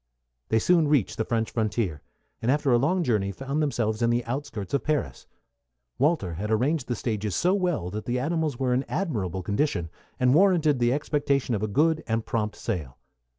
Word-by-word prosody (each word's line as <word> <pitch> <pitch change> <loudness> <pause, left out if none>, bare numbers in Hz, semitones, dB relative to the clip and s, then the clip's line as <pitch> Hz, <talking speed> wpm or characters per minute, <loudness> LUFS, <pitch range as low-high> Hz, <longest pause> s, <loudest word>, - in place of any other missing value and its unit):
They 110 - +3
soon 165 +6 +3
reached 145 -8 +1
the 110 - -1
French 115 -1 -1
frontier, 110 -8 -1 0.4
and 115 - -1
after 145 0 +2
a 120 - +5
long 175 +7 +1
journey 105 -8 +1
found 135 +8 -3
themselves 115 -6 0
in 115 - +3
the 120 0 +1
outskirts 115 -5 -5
of 140 - +1
Paris. 150 -3 -2 0.7
Walter 140 - +1
had 100 +6 -4
arranged 125 +6 +1
the 120 - -1
stages 105 -4 -2
so 180 +2 +2
well 175 - 0
that 105 +2 -5
the 125 +1 -1
animals 155 0 -1
were 125 -1 +1
in 130 +2 +1
admirable 100 - -2
condition, 100 - -1 0.3
and 125 0 +4
warranted 165 -5 +4
the 120 0 +3
expectation 140 -2 0
of 105 - -1
a 110 - 0
good 155 +9 +2
and 115 0 -1
prompt 105 -2 -2
sale. 80 - -4
125 Hz, 190 wpm, -26 LUFS, 110-150 Hz, 0.7 s, a